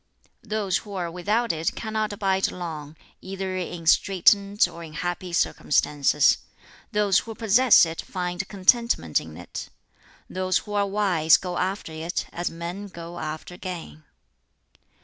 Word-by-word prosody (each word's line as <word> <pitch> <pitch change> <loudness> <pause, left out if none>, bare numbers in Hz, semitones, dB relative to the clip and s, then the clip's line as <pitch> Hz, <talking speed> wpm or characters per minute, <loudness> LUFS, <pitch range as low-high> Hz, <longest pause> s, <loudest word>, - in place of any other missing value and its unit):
"Those 210 -4 -1
who 205 -2 -9
are 175 -2 -3
without 210 +7 0
it 160 0 -2
cannot 215 -1 -2
abide 195 -2 0
long, 160 -4 -6 0.3
either 190 0 -4
in 175 -2 -4
straitened 200 +4 +4
or 170 - -10
in 155 -2 -10
happy 175 +2 -3
circumstances. 150 -3 +2 0.5
Those 205 -2 +3
who 225 -1 -8
possess 225 0 +6
it 165 0 -5
find 180 0 -4
contentment 235 +5 +2
in - - -11
it. - - -7 0.6
Those 185 0 0
who 210 - -6
are 200 -1 +2
wise 190 -6 +4
go 180 -2 -4
after 190 -2 -2
it 160 +3 -3
as 175 +1 -2
men 175 +5 -6
go 170 -2 -9
after 155 +3 -6
gain. 175 -4 -7
185 Hz, 140 wpm, -25 LUFS, 170-205 Hz, 0.6 s, possess